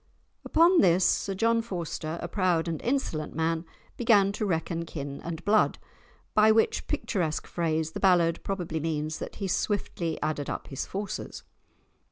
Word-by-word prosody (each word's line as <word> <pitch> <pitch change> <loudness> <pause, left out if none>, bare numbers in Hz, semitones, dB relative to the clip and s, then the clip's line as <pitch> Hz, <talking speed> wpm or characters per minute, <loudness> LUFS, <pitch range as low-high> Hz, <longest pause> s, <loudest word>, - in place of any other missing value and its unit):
Upon 340 +3 +5
this 180 -1 +4
Sir 195 - +1
John 230 +3 +2
Forster, 170 -6 -4
a - - -2
proud 175 -3 +1
and 165 -2 -3
insolent 235 - -2
man, 165 +1 0 0.3
"began 210 -5 +4
to 210 +1 -2
reckon 165 -1 -1
kin 140 -4 -6
and 170 0 -6
blood," 215 +1 +3 0.6
by 215 +1 +6
which 220 0 +2
picturesque 170 -7 -1
phrase 160 -2 -1
the - - -5
ballad 175 -3 +3
probably 175 -5 -3
means 155 0 -2
that - - -6
he 195 - -3
swiftly 175 -4 -1
added 150 -2 -2
up - - -5
his 135 - -4
forces. 200 0 -5
170 Hz, 155 wpm, -28 LUFS, 160-205 Hz, 0.6 s, by